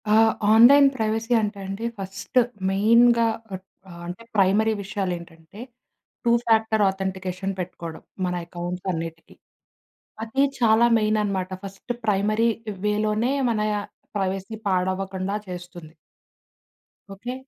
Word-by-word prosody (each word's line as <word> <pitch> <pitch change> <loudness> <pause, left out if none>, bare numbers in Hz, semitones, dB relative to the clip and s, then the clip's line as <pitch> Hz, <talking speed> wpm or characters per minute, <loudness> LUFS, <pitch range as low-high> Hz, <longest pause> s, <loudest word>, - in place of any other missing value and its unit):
ఆ! - - +4 0.4
Online 275 +6 +8
privacy 225 0 -1
అంటే 210 -1 -3
అండి 195 +4 -5
ఫస్ట్ 195 +5 -6 0.3
మెయిన్‌గా 230 +4 +4 0.2
పట్ 190 -1 -7 0.2
ఆహ్, 170 -1 -11
అంటే 180 +6 -7
ప్రైమరీ 205 +3 +3
విషయాలేంటంటే 180 -3 -6 0.7
టూ 235 - +4
ఫ్యాక్టర్ 220 -1 +3
ఆథెంటికేషన్ 190 0 -3
పెట్టుకోడం, 170 -2 -6 0.2
మన 180 - -1
అకౌంట్స్ 175 +1 -6
అన్నిటికి. 165 -1 -6 0.9
అది 265 +5 +1 0.2
చాలా 230 0 +5
మెయిననమాట. 210 -4 0
ఫస్ట్ 195 +5 -6
ప్రైమరీ 215 +2 +2 0.4
వేలోనే 215 +3 +1 0.2
మన 215 -2 -1 0.6
ప్రైవసీ 195 +2 -3
పాడవ్వకండా 190 +1 -1
చేస్తుంది. 175 -3 -9 1.2
ఓకే. 240 +6 -6
195 Hz, 105 wpm, -24 LUFS, 185-220 Hz, 1.2 s, Online